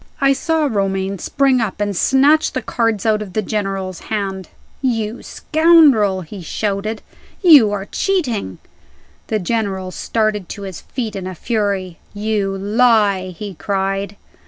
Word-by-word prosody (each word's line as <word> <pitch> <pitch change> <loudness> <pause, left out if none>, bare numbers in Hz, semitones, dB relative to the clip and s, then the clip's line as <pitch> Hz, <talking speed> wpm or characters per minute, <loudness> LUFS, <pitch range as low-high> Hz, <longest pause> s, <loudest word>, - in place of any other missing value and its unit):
I 275 -1 +4
saw 320 +2 0
Romayne 195 -5 -1
spring 270 +1 +2
up, 205 -3 -3
and 205 -1 -1
snatch 285 - +3
the 255 - -3
cards 225 -4 -1
out 215 -1 +2
of 195 -4 -7
the 215 - -1
General's 195 -3 -3
hand. 195 -4 -3 0.3
"You 230 -3 -1
scoundrel!" 300 - +4
he 185 +3 -9
shouted, 210 +5 -3 0.4
"you 290 - +7
are 200 -1 -3
cheating!" 245 - -1 0.7
The 220 - 0
General 195 -2 -2
started 215 -3 -1
to 200 - -7
his 190 -3 -7
feet 230 -5 -5
in 190 -2 -5
a 185 - -6
fury. 200 -4 -2 0.2
"You 205 -2 -1
lie!" 205 -2 +2
he 205 -2 -6
cried. 195 +2 -2
210 Hz, 140 wpm, -18 LUFS, 195-235 Hz, 0.7 s, you